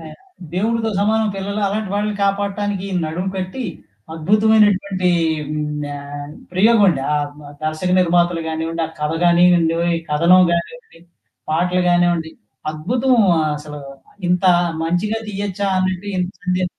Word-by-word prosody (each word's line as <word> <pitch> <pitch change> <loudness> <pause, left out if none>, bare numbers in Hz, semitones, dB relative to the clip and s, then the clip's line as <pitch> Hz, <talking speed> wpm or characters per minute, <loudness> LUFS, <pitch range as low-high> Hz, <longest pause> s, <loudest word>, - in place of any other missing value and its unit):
ఆయ్ 155 -1 -10 0.4
దేవుడితో 225 +3 0
సమానం 220 +1 +2
పిల్లలు 200 +2 -3
అలాంటి 210 -1 -3
వాళ్ళని 210 0 -1
కాపాడటానికి 200 0 -1 0.2
నడుము 180 +5 -3
కట్టి, 190 +7 -4 0.5
అద్భుతమైనటువంటి 200 0 +3 0.4
హ్మ్, 150 -1 -3
ఆహ్, 145 +1 -8 0.2
ప్రయోగమండి. 200 -5 +4
ఆ - - +2 0.2
మా 145 - -11 0.2
దర్శక 155 +4 -2
నిర్మాతలు 175 -1 +2
గానివ్వండి, 165 +1 -3
ఆ 160 - -12
కథ 150 +1 0
గానివ్వండి, 175 -1 +4 0.2
ఈ - - -9
కథనం 170 +5 +5
గానివ్వండి, 170 - -5 0.5
పాటలు 180 +3 +1
గానివ్వండి, 175 -2 +2 0.4
అద్భుతం 240 +12 0 0.2
ఆహ్, 155 -1 +1
అసలు 150 -1 -9 0.5
ఇంత 180 +1 +1 0.4
మంచిగా 200 +7 0
తీయొచ్చా 200 -1 -3
అన్నట్టు 185 +1 -1
ఈ - - -2 0.2
సందే 180 0 0
180 Hz, 125 wpm, -19 LUFS, 165-205 Hz, 0.5 s, కథనం